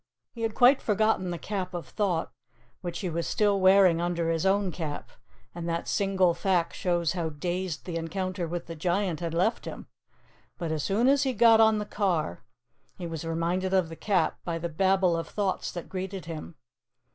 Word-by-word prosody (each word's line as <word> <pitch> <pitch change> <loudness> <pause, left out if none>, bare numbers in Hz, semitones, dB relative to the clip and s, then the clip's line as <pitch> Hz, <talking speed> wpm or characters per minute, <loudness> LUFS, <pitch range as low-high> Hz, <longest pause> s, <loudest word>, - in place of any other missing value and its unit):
He 230 - -8
had 225 -1 -1
quite 260 +2 +6
forgotten 210 -3 +1
the 175 - -3
Cap 185 -1 -4
of 175 - -5
Thought, 185 -6 -1 0.5
which 175 -2 -5
he 185 - -2
was 170 +1 -2
still 205 -2 +2
wearing 185 -3 +5
under 170 -1 0
his 165 +3 0
own 195 -1 +2
cap, 155 -3 -5 0.4
and 170 0 -5
that 170 0 -2
single 190 -3 +2
fact 175 -1 0
shows 175 -3 0
how 170 -3 -2
dazed 175 +2 -3
the 170 -2 -3
encounter 180 +2 -3
with 175 +1 -4
the 165 - -7
Giant 175 +1 0
had 165 -1 -3
left 190 +7 +1
him. - - -7 0.7
But 170 -3 -3
as 155 -1 -1
soon 205 - +1
as 280 +1 +4
he 265 -2 +1
got 225 0 +6
on 220 -1 +5
the 210 - -2
car, 180 - -1 0.6
he 175 - -6
was 165 -2 -5
reminded 170 +3 -1
of 180 -4 +2
the 165 - -7
Cap 185 -2 0
by 170 -1 -2
the 170 +1 -3
babel 185 +1 +2
of 165 - -3
thoughts 200 -3 -2
that 175 - -7
greeted 190 -1 -5
him. 165 0 -7
180 Hz, 190 wpm, -28 LUFS, 165-195 Hz, 0.7 s, quite